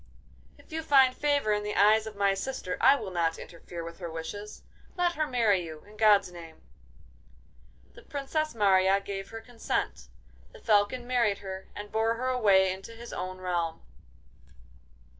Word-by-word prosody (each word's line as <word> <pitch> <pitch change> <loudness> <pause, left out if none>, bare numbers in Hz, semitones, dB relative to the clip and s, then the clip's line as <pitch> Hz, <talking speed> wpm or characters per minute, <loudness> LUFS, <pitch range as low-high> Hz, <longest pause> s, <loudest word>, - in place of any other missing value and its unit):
'If - - -21
you 320 +1 -3
find 270 -4 +5
favour 285 -7 +1
in 210 - 0
the 210 0 -4
eyes 215 +2 +4
of 215 - -8
my 200 -1 +2
sister, 195 -3 -4
I 275 - +7
will 215 -8 -6
not 165 -2 0
interfere 170 0 -9
with 170 +2 -9
her 175 -2 -5
wishes. 165 +6 -7 0.3
Let 355 -1 +2
her 310 -2 -1
marry 220 -8 +2
you, 155 -2 -9
in 210 +1 -16
God's 210 -3 +4
name!' 165 -2 -12 1.3
The - - -14
Princess 290 0 -3
Marya 195 -2 +4
gave 195 -1 -6
her 225 0 -8
consent; 225 - -3 0.5
the - - -13
Falcon 215 +4 +2
married 235 -5 +1
her 190 0 -6
and 205 0 -8
bore 225 +1 +1
her 255 +2 -2
away 195 -7 +4
into 195 +4 -10
his 235 +1 -10
own 185 0 -5
realm. 170 -3 -2
205 Hz, 165 wpm, -28 LUFS, 185-240 Hz, 1.3 s, I